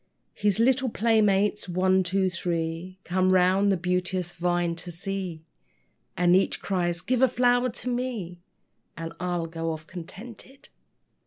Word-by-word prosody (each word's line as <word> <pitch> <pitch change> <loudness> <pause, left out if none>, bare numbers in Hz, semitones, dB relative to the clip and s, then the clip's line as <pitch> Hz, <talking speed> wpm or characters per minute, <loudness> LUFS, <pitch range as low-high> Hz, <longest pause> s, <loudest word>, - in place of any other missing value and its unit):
His 205 -1 +1
little 255 +2 +3
playmates, 210 -3 +2
one, 185 +1 +3
two, 190 +1 +1
three, 170 +1 -3
Come 185 +1 +1
round 185 +2 +4
the 190 - +2
beauteous 180 0 -1
vine 175 -1 0
to 175 +1 -6
see, 180 -2 -5 0.7
And 175 0 +4
each 190 - +2
cries, 175 -3 -1
"Give 245 +7 0
a 260 - +7
flower 245 0 +2
to 245 - -5
me, 240 -8 -3 0.6
And 165 0 -6
I'll 175 -2 -1
go 165 0 -3
off 155 -1 -6
contented." 205 +10 -11
185 Hz, 140 wpm, -26 LUFS, 175-210 Hz, 0.7 s, a